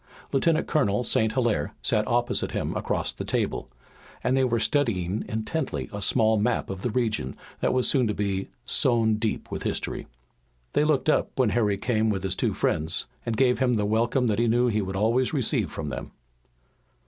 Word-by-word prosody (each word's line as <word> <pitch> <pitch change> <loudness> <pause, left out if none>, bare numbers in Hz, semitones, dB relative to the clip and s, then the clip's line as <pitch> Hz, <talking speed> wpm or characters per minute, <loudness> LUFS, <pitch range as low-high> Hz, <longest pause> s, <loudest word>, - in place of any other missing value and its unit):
Lieutenant 160 +4 +2
Colonel 120 -6 +1
St. 110 -2 +1
Hilaire 115 - 0
sat 105 0 +2
opposite 120 0 0
him - - -2
across - - -1
the - - -6
table, - - -2 0.5
and 130 - +2
they 135 - +3
were 120 -2 +1
studying 110 -6 0
intently 110 +9 -3
a 100 - -4
small 110 +2 +3
map 110 -1 0
of 95 0 -7
a 125 - 0
region 115 -1 -1 0.2
that - - +1
was 130 -1 +3
soon 130 -5 +3
to 105 - 0
be 100 -2 -1 0.2
sown 115 -3 +2
deep 110 0 -3
with - - -4
history. - - -3 0.7
They - - +3
looked 150 -2 +1
up 155 - +1
when 130 -4 +3
Harry 105 -3 +1
came 110 +1 +1
with 95 -3 -1
his 95 -1 -1
two - - 0
friends, 80 +1 0 0.2
and 115 -2 -1
gave 125 0 +3
him 125 -2 +2
the 105 -2 +1
welcome 115 +4 +1
that 110 -2 +1
he 120 - +3
knew 120 +2 +3
he 110 -1 +1
would 95 -1 -4
always 115 +8 +1
receive 130 -5 0
from - - -4
them. - - -5
115 Hz, 190 wpm, -26 LUFS, 105-125 Hz, 0.7 s, they